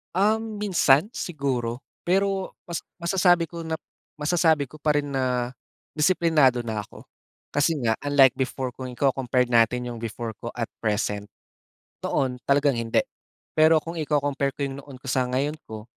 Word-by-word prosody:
Um, 215 +2 +1
minsan 180 -4 +4
siguro. 135 - -3 0.2
Pero 195 +1 +1 0.2
mas 170 - -2 0.2
masasabi 175 -1 +3
ko 170 -1 -7
na 160 - -3 0.4
masasabi 155 -2 +2
ko 155 - -12
pa 150 0 +1
rin 145 -1 0
na 125 -3 0 0.5
disiplinado 150 -6 +4
na 110 -3 -4
ako. - - -14 0.5
Kasi 145 +3 +2
nga 115 -2 +1
unlike 140 -3 +5
before 130 0 -2
kung 130 0 -7
iko-compared 125 -1 +1
natin 125 +1 +3
iyong 120 - -6
before 115 0 -5
ko 120 - -7
at 115 -2 -3
present. 105 -2 -1 0.7
Noon, 130 -2 -1
talagang 140 -3 +3
hindi. 115 -1 +1 0.5
Pero 155 0 +5
kung 165 0 -5
iko-compare 145 -2 0
ko - - -39
'yong 135 0 -3
noon 140 -2 -11
ko 135 - -12
sa 130 -1 +1
ngayon 135 +4 -1
ko, 110 -1 -7
140 Hz, 155 wpm, -25 LUFS, 125-160 Hz, 0.7 s, unlike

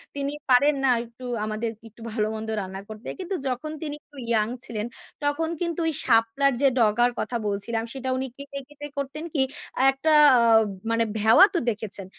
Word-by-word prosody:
তিনি 280 0 -2 0.2
পারেন 280 +4 +5
না 265 - +4
একটু 235 +2 -13 0.2
আমাদের 215 +1 -3 0.2
একটু 225 +2 -19
ভালো 215 -1 0
মন্দ 220 0 -5
রান্না 190 0 -6
করতে। 215 +1 -10
কিন্তু 375 +1 -3
যখন 260 +4 -3
তিনি 295 -2 -4
একটু 290 - -20
ইয়াং 215 -2 +2 0.2
ছিলেন, 215 -2 -4 0.4
তখন 290 +3 0
কিন্তু 340 -1 -2
ওই 320 - 0
শাপলার 230 +5 +3
যে 280 - +5
ডগার 235 +2 +4
কথা 240 - -2
বলছিলাম 205 +3 -1
সেটা 260 -1 -4
উনি 265 +1 -2
কেটে, 280 0 -7
কেটে 290 0 -9
করতেন 280 +3 -4
কি? 285 - +2 0.5
একটা 290 +4 +1 0.3
আ - - +4 0.5
মানে 230 0 +2 0.2
ভেওয়া 220 - +8
তো - - +3
দেখেছেন? 210 -3 -2
250 Hz, 175 wpm, -25 LUFS, 220-285 Hz, 0.5 s, ভেওয়া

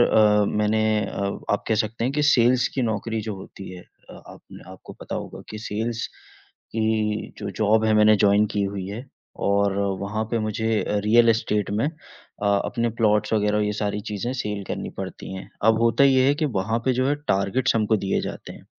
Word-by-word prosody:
अ, 105 -3 +5
मैंने 105 +1 +1 0.2
अ, 100 0 -3 0.2
आप 105 - 0
कह 110 - +3
सकते 115 +2 -4
हैं 130 - 0
कि 150 +1 0
सेल्स 125 +1 +4
की 130 - 0
नौकरी 110 0 -2
जो - - -3
होती 95 0 -10
है 90 -1 -10 0.3
अ, - - -12
आप - - -12
न - - -10
आपको 95 - -12
पता - - -6
होगा - - -6
कि 110 - -6
सेल्स 115 +2 -2 0.7
की 110 -1 0
जो - - -4
जॉब 110 +1 +3
है 110 0 +3
मैंने 105 0 +6
जॉइन 100 +1 +4
की 105 - +1
हुई 100 -1 -3
है 110 +5 -6 0.4
और 100 0 +2 0.3
वहाँ 105 +2 -2
पे 115 - 0
मुझे 110 +1 -1 0.2
रियल 115 +2 +5
एस्टेट 105 -3 +1
में 105 +5 0
अ, - - -1 0.7
अपने 120 -1 -1
प्लॉट्स 105 -1 +2
वगैरह 105 -1 +2
ये 105 - -1
सारी 105 0 -2
चीजें 105 +4 -3
सेल 105 -5 -3
करनी - - -4
पड़ती - - -6
है। 95 - -8 0.2
अब 110 +1 +4
होता 115 +4 +4
ये 130 -1 +4
है 140 - +4
कि - - +3 0.2
वहाँ 110 +4 -1
पे 130 - +3
जो 130 +2 +1
है 145 - +2
टार्गेट्स 100 +7 +1
हमको 110 0 +2
दिए 95 -1 -1
जाते - - -7
हैं, - - -14
110 Hz, 200 wpm, -24 LUFS, 105-115 Hz, 0.7 s, मैंने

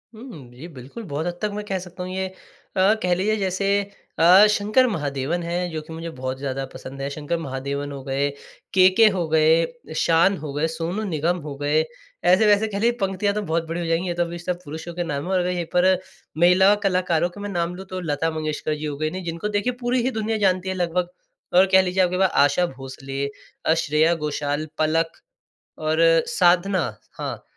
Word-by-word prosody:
हुँ, 215 - -11
जी, 155 +7 -9
बिल्कुल 140 - -10
बहुत 155 -2 -4
हद 175 0 -4
तक 210 -1 -1
मैं 210 0 -4
कह 190 -2 -2
सकता 180 0 -8
हूँ 185 - -6
ये 190 0 -2
अ, 190 +1 -1
कह 180 -1 +2
लीजिए 210 +4 +1
जैसे 190 0 -1 0.5
अ, 185 +5 +8
शंकर 215 +5 +3
महादेवन 150 - -2
हैं, 175 +1 -2
जो 155 -1 -4
कि 160 +1 -11
मुझे 165 +1 -6
बहुत 130 -3 -5
ज़्यादा 135 -1 -3
पसंद 135 +1 -9
है, 140 - -2
शंकर 150 +4 -3
महादेवन 140 -1 -4
हो 135 -1 -7
गए, 140 +1 0 0.4
केके 190 +4 +6
हो 170 -3 -1
गए, 160 +1 +4 0.3
शान 170 +4 +3
हो 150 -1 -6
गए, 150 +3 0
सोनू 165 +6 -3
निगम 170 -1 0
हो 140 - -5
गए, 145 +2 +2 0.4
ऐसे-ऐसे 205 +4 +4
कह 200 -1 -4
लीजिए 235 +2 +3
पंक्तियाँ 195 +1 0
तो 210 - 0
बहुत 165 -2 -1
बड़ी 165 +1 -3
हो 170 - -3
जाएँगी। 165 +2 0
ये 175 - -1
तो 175 0 +1
अभी 170 0 -6
सब 175 0 -3
पुरुषों 160 +3 -7
के 175 0 -2
नाम 145 -4 -3
है 190 - -4
और 185 - +3
अगर 180 0 0
यही 175 -2 -2
पर 185 +1 +5 0.5
महिला 180 +4 +6
कलाकारों 180 -2 +1
के 205 - -13
मैं 205 - -4
नाम 175 -1 -2
लूँ 190 +1 -9
तो 185 0 -4
लता 160 0 -1
मंगेशकर 155 -1 -2
जी 150 +1 -6
हो 145 -1 -4
गई, 155 0 -1
नहीं 185 +1 -6
जिनको 170 +4 -3
देखिए 245 +4 0
पूरी 245 +1 +1
ही 260 - 0
दुनिया 220 -1 -1
जानती 190 -2 +1
है 190 - -2
लगभग, 175 0 -1 0.4
और 185 +2 +7
कह 190 0 +7
लीजिए 185 0 +1
आपके 180 0 0
पास 190 -1 +3 0.2
आशा 160 +5 +2
भोसले 135 +1 -5 0.4
अ, 160 - +4
श्रेया 160 +1 +2
घोषाल, 150 0 -2
पलक 160 +1 +1 0.7
और 155 +1 -1 0.3
साधना, 180 +1 +3 0.4
हाँ, - - -5
175 Hz, 210 wpm, -23 LUFS, 155-190 Hz, 0.7 s, अ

